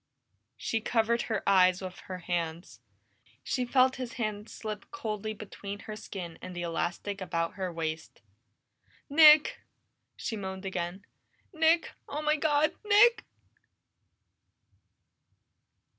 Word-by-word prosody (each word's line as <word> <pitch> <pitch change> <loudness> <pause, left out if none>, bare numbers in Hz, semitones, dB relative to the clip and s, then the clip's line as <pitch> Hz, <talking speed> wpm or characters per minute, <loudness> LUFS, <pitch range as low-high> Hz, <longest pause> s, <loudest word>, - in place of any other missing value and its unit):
She 225 - -2
covered 235 +1 +1
her 220 -2 -2
eyes 185 -2 +5
with 185 -1 -7
her 185 -1 -5
hands. 170 - -4 0.6
She 250 -2 -1
felt 255 +1 +3
his 250 -3 -5
hand 215 -2 -4
slip 215 -2 -7
coldly 215 -6 -4
between 205 0 -8
her 215 - -7
skin 180 -5 -8
and 185 -1 -8
the 175 - -3
elastic 175 +4 -3
about 165 -2 -2
her 185 -1 -3
waist. 160 -1 -5 0.9
"Nick!" 305 0 +7 0.6
she 225 - -3
moaned 190 -1 -6
again. 185 +1 -4 0.5
"Nick! 325 +1 +3 0.2
Oh, 300 +1 -4
my 305 0 +3
God! 305 0 +2
Nick!" 440 +3 +5
210 Hz, 115 wpm, -29 LUFS, 185-255 Hz, 0.9 s, Nick